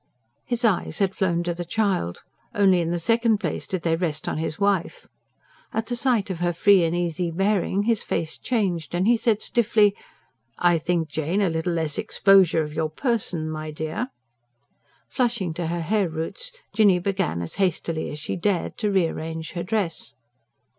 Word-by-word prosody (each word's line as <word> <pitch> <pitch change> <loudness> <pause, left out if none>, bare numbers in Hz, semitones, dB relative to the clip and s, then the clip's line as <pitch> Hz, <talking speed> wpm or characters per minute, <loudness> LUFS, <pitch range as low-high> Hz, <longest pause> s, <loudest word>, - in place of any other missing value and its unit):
His 240 0 0
eyes 205 -6 +1
had 195 -2 +1
flown 175 -3 0
to 175 0 -1
the 175 +1 -5
child; 180 - -1 0.3
only 190 -3 +4
in 165 - -1
the 175 - 0
second 230 +5 +2
place - - -3
did 185 -3 -3
they 165 -1 +2
rest 160 -3 -2
on - - -2
his 160 -1 -3
wife. 200 -3 0 0.7
At 225 - -1
the 240 - -3
sight 235 -5 +1
of 175 - -5
her 175 0 0
free 190 +2 +5
and 165 +1 0
easy 175 0 -1
bearing 195 +2 +1
his 225 -1 +2
face 160 -1 -2
changed, 180 - -1
and 180 +2 +1
he 240 +2 +5
said 220 -2 +1
stiffly: 215 -3 +3 0.6
"I 175 -2 +3
think, 170 0 0
Jane, 160 +5 -1
a 200 -3 +2
little 160 +2 -1
less 160 -3 -1
exposure 190 -5 +4
of 150 0 -7
your 160 0 -1
person, 180 - -1
my 155 0 -5
dear...." 155 +10 -3 1.0
Flushing 235 - -1
to 170 0 -3
her 170 +1 -2
hair 195 +2 +1
roots, 165 - -4 0.2
Jinny 205 -3 +5
began 185 - -1
as 85 - -6
hastily 165 -3 -1
as 150 - -6
she 150 - -4
dared 185 0 -1
to 210 - +1
re 190 -3 +3
arrange 160 0 -5
her 175 - -4
dress. 180 -2 -2
180 Hz, 180 wpm, -24 LUFS, 165-205 Hz, 1.0 s, free